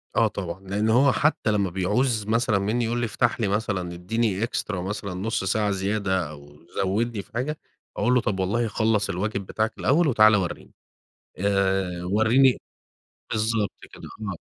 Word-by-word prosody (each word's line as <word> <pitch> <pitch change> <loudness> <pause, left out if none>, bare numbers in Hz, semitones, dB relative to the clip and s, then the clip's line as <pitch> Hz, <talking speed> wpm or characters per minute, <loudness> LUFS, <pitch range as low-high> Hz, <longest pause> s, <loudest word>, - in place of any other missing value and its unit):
آه 115 -2 +4
طبعًا، 95 -3 -5
لأنّه 105 +3 +1
هو 135 +2 +5
حتّى 145 -7 +1
لمّا 100 -3 +1
بيعوز 105 +4 0
مثلًا 110 -2 +2
مِنّي 115 +4 0
يقول 120 +1 -1
لي: 120 - 0
"افتح 120 +2 0
لي 105 - +1
مثلًا 95 -4 -1
اديني 105 +3 -1
extra 115 - -3
مثلًا 95 +1 -4
نص 100 +2 -2
ساعة 105 +1 +1
زيادة 95 -3 -1
أو 75 -1 -13 0.3
زودني 105 +3 -1
في - - -21
حاجة"، 145 +6 -2 0.4
أقول 125 - +2
له: 125 - +4
"طب 100 -4 -2
والله 110 +5 0
خلص 110 -2 +1
الواجب 100 +1 -2
بتاعك 110 +3 -1
الأوّل، 155 +4 +3
وتعالَ 110 -4 +6
ورّيني، 95 -4 -3 0.7
آآ، 95 -2 0
ورّيني" 110 +7 +4 0.7
بالضبط 110 -1 0 0.2
كده، - - -13 0.2
آه، 100 -6 -4
105 Hz, 160 wpm, -25 LUFS, 95-115 Hz, 0.7 s, وتعالَ